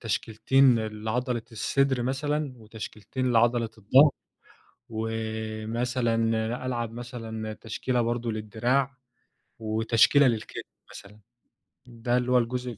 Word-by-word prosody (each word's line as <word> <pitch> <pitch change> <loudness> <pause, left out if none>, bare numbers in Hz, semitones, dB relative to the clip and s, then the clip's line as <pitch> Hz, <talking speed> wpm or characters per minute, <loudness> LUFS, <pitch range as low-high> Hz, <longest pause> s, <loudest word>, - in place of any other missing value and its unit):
تشكيلتين 115 +3 +3
لعضلة 110 +3 -2
الصدر 130 +3 +1
مثلًا، 145 +2 -1
وتشكيلتين 110 +3 -4
لعضلة 115 0 +3
الظَهر، 130 +8 +6 0.8
ومثلًا 110 +2 -2 0.5
ألعب 120 -3 -2
مثلًا 115 -3 -6
تشكيلة 120 +3 -2
برضه 120 0 -1
للدراع، 120 +5 -1 0.6
وتشكيلة 115 +5 +4
للكتف 115 -3 -2 0.3
مثلًا. 105 +2 -12 0.7
ده 120 +1 -1
اللي 125 0 0
هو 125 - +6
الجزء 125 -1 -2
115 Hz, 95 wpm, -27 LUFS, 110-125 Hz, 0.8 s, الظَهر